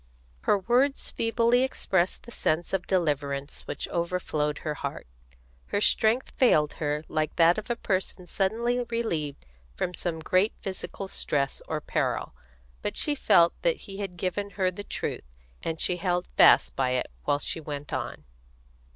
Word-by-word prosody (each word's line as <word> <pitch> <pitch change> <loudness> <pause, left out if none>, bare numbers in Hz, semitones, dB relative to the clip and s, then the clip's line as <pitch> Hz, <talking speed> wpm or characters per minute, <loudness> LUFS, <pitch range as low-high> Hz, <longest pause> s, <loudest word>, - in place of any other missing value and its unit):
Her - - +5
words 250 +7 +1
feebly 230 +2 +2
expressed 190 -8 0
the 235 - -11
sense 170 -5 0
of 190 -1 -1
deliverance 145 -5 -1
which - - -4
overflowed 170 -4 -1
her 150 - 0
heart. - - -5 0.6
Her - - 0
strength 220 +4 +2
failed 155 - +4
her 150 0 0
like 155 -1 -1
that 170 +3 +5
of 215 - -10
a 240 - +1
person 190 -4 -2
suddenly 230 +7 0
relieved 165 -12 -2 0.3
from 180 - -2
some 175 -2 -3
great 185 +6 +2
physical 195 0 -5
stress 140 -6 -1
or 155 -1 -2
peril; - - -1 0.5
but - - -3
she 295 - +1
felt 170 -11 +5
that - - +1
he 195 -2 -8
had 195 -3 -5
given 195 +3 -2
her 185 -2 +2
the 205 +3 -7
truth, 65 - -4 0.3
and 160 -1 -3
she 180 - +1
held 180 0 0
fast - - +6
by 130 -1 +1
it 125 - -3
while 145 - +3
she 145 - -3
went 145 -2 -6
on. - - -3
180 Hz, 160 wpm, -27 LUFS, 155-215 Hz, 0.6 s, fast